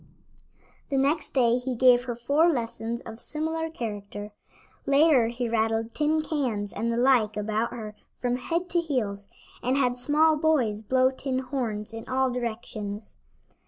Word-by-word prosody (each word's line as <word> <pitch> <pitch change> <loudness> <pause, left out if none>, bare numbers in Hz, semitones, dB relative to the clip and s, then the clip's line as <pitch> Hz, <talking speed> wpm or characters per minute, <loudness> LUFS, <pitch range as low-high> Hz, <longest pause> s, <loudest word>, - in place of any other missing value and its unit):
The 275 - 0
next 285 +3 +1
day 240 -3 +4
he 250 0 -3
gave 245 0 +5
her 240 -2 -3
four 285 +8 +3
lessons 235 -3 -3
of 225 0 -9
similar 320 +3 -2
character. 205 -6 -6 0.6
Later 275 -4 +5
he 240 +1 -3
rattled 225 0 0
tin 310 +1 +1
cans 240 -11 -2
and 235 +1 -1
the 230 - -1
like 240 -4 +3
about 215 +2 -1
her 215 -3 -7 0.2
from 245 0 0
head 335 +8 -2
to 345 - +3
heels, 215 -11 -2 0.3
and 255 +3 +1
had 250 -2 +1
small 305 +4 +3
boys 265 -10 +1
blow 255 +4 +3
tin 265 0 -3
horns 245 -5 -3
in 225 0 -8
all 260 0 +1
directions. 220 -3 -5
245 Hz, 155 wpm, -26 LUFS, 225-280 Hz, 0.6 s, gave